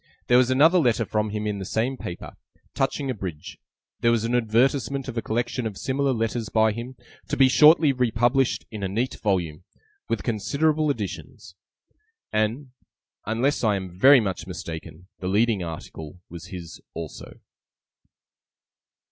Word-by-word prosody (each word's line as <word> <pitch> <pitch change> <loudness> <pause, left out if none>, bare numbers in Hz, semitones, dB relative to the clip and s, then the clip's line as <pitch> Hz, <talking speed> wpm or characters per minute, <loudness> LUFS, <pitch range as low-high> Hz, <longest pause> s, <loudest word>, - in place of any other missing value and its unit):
There 125 - +6
was 130 -1 +3
another 155 +8 +5
letter 120 -6 +2
from 105 0 -1
him 105 0 -3
in 105 -1 -2
the - - -4
same 115 +7 -1
paper, 85 -8 -7 0.4
touching 135 0 -1
a - - -1
bridge; 90 -8 -7 0.4
there 115 - +3
was 115 -2 +2
an 115 - -1
advertisement 125 +3 +1
of 130 - -5
a 115 - -1
collection 120 +2 -2
of 105 -3 -7
similar 135 +1 0
letters 115 -1 -2
by 110 0 +3
him, 120 +4 -7 0.3
to - - -2
be 135 - +6
shortly 150 +2 +6
republished, 125 +1 +1
in 105 -2 -6
a 95 - -1
neat 120 +7 -2
volume, 90 -6 -1 0.5
'with - - -1
considerable 145 +8 0
additions'; 95 - -5 0.8
and, 115 +6 -1 0.6
unless 120 +7 0
I 105 -2 +3
am 95 -2 -5
very 135 +8 +7
much 95 -6 -3
mistaken, 80 -1 -8
the 90 - -4
Leading 105 +1 +2
Article 80 0 -8
was 85 -1 -9
his 85 -3 -9
also. 80 -2 -8
115 Hz, 155 wpm, -24 LUFS, 95-130 Hz, 0.8 s, very